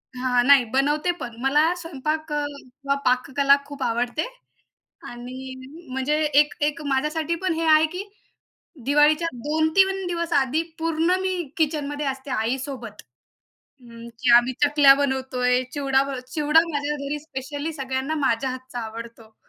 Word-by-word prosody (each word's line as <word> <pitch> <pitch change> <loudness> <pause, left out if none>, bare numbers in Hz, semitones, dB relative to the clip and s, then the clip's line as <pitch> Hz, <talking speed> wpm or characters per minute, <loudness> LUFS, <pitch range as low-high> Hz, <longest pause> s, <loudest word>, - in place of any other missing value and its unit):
हां, 250 -1 +1
नाही, 280 -3 +7
बनवते 295 +6 +2
पण, 240 - -5
मला 300 +5 +3
स्वयंपाक 315 -2 -4
अ, 295 0 0
किंवा 280 0 -5
पाककला 275 +2 +3
खूप 285 -1 -10
आवडते 245 +7 -1 0.8
आणि 255 +2 -8 0.4
म्हणजे 265 +3 0 0.2
एक 295 - 0
एक 300 +1 -1
माझ्यासाठी 300 +4 0
पण 365 - +2
हे 330 0 -2
आहे 310 0 +6
की 365 +2 -4 0.8
दिवाळीच्या 300 +3 +3 0.2
2-3 360 +5 +2
दिवस 340 -1 -3
आधी 285 +3 +2 0.2
पूर्ण 330 +2 +1
मी 375 0 -1 0.2
किचनमध्ये 295 -2 -1
असते 265 0 -4
आईसोबत. 245 -1 -3 0.8
अ, - - -24 0.4
की 250 - +1
आम्ही 245 +2 +3
चकल्या 285 -2 +6
बनवतो 265 -2 -2
आहे, 250 0 +3
चिवडा 275 -2 +1
बनव 270 -2 -5
चिवडा 300 +1 +4
माझ्या 290 +1 -1
घरी 280 +1 -4
स्पेशली 290 +2 -5
सगळ्यांना 265 +1 -3
माझ्या 255 +3 0
हातचा 255 -1 -7
आवडतो. 225 0 -9
280 Hz, 140 wpm, -23 LUFS, 260-310 Hz, 0.8 s, नाही